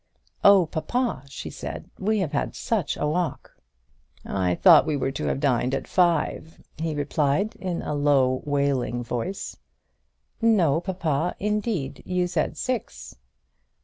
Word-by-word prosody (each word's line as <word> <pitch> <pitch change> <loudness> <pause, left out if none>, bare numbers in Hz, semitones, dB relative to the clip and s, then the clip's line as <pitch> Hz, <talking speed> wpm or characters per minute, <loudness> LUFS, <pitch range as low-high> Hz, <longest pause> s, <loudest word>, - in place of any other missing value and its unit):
"Oh, 200 -3 +7
papa," 165 - -2
she 140 - -7
said, - - -7
"we 215 +3 +1
have 160 -6 -2
had 140 - -2
such 210 -9 -1
a - - -1
walk!" 170 +3 -2 0.7
"I 90 -2 0
thought 170 -4 +7
we 150 -2 0
were 135 0 -1
to 135 - -4
have - - -1
dined 130 -2 +1
at - - -4
five," 170 -2 +1 0.2
he 160 -1 -2
replied, 145 +7 0
in 180 -3 -3
a - - -3
low 140 -3 +2
wailing 140 -4 0
voice. 120 +11 -4 0.8
"No, 180 -9 +3
papa, 175 -3 -1
indeed, 210 - -1
indeed - - -12
you 180 0 +2
said 180 - -1
six." 255 -4 -4
155 Hz, 145 wpm, -25 LUFS, 140-190 Hz, 0.8 s, Oh